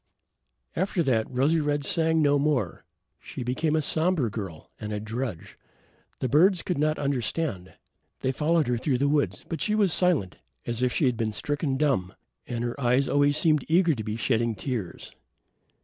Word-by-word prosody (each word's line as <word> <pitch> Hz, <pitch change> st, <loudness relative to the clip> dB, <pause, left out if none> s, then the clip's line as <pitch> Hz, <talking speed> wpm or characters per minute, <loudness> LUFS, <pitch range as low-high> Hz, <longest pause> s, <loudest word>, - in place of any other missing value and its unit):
After 190 Hz, -1 st, 0 dB
that, 115 Hz, -6 st, +1 dB
Rosy 140 Hz, +6 st, +2 dB
red 145 Hz, -1 st, 0 dB
sang 160 Hz, 0 st, +2 dB
no 145 Hz, 0 st, +3 dB
more. 140 Hz, -, -1 dB, 0.3 s
She -, -, -7 dB
became 140 Hz, +6 st, 0 dB
a 155 Hz, -, +1 dB
somber 160 Hz, -, +1 dB
girl 95 Hz, -8 st, -7 dB
and 105 Hz, -, -5 dB
a 105 Hz, -, -2 dB
drudge. 110 Hz, -3 st, -5 dB, 0.6 s
The 130 Hz, -, +1 dB
birds 170 Hz, -, +4 dB
could 180 Hz, -6 st, -2 dB
not 155 Hz, +1 st, +1 dB
understand. 135 Hz, -, -2 dB, 0.5 s
They 130 Hz, -, +1 dB
followed 155 Hz, +3 st, +1 dB
her 120 Hz, -1 st, +1 dB
through 130 Hz, 0 st, 0 dB
the 140 Hz, +3 st, +1 dB
woods, 145 Hz, 0 st, 0 dB
but 165 Hz, -, -4 dB
she 215 Hz, -, +1 dB
was 200 Hz, -6 st, +3 dB
silent, 170 Hz, -, +1 dB, 0.3 s
as 120 Hz, 0 st, -3 dB
if 125 Hz, -1 st, +2 dB
she 145 Hz, -, +1 dB
had 125 Hz, -3 st, +1 dB
been 110 Hz, -2 st, -1 dB
stricken 145 Hz, +3 st, -2 dB
dumb, 130 Hz, -11 st, 0 dB, 0.3 s
and 120 Hz, -1 st, -3 dB
her 120 Hz, +3 st, -4 dB
eyes 125 Hz, +2 st, +2 dB
always 145 Hz, +1 st, +3 dB
seemed 155 Hz, -4 st, +3 dB
eager 170 Hz, 0 st, +3 dB
to 110 Hz, -5 st, -4 dB
be 105 Hz, 0 st, -3 dB
shedding 115 Hz, -1 st, 0 dB
tears. 110 Hz, -5 st, -5 dB
140 Hz, 180 wpm, -26 LUFS, 115-155 Hz, 0.6 s, birds